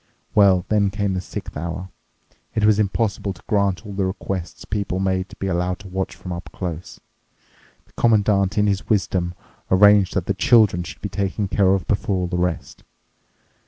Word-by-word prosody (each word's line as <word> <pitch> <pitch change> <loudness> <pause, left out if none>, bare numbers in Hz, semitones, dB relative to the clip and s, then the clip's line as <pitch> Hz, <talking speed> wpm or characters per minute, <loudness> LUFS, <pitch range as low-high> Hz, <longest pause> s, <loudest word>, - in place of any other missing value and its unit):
Well, 95 -3 +5
then 105 -2 +3
came 100 0 -1
the 95 - -2
sixth - - -7
hour. 85 +4 -5 0.7
It 110 -2 +2
was 110 -1 +4
impossible 100 -1 0
to 85 - -19
grant 100 0 +1
all 100 - -7
the 100 0 -1
requests 95 -2 -5
people 100 -2 -2
made 95 -1 -1
to - - -12
be - - -5
allowed 90 0 -1
to 100 - -11
watch 95 +1 -3
from 90 - -7
up 85 +1 -7
close. 85 -2 -6 0.9
The - - -29
Commandant, 105 -2 +2
in 105 - +4
his 100 -1 -1
wisdom, 90 -4 0 0.3
arranged 100 0 +5
that 95 -3 0
the 100 - 0
children 100 -2 +4
should 85 - -9
be - - -2
taken 100 +1 -2
care 95 0 +3
of 95 -4 -3
before 100 -1 0
all 90 -1 0
the 90 - -4
rest. 90 -2 -3
95 Hz, 185 wpm, -22 LUFS, 90-100 Hz, 0.9 s, Well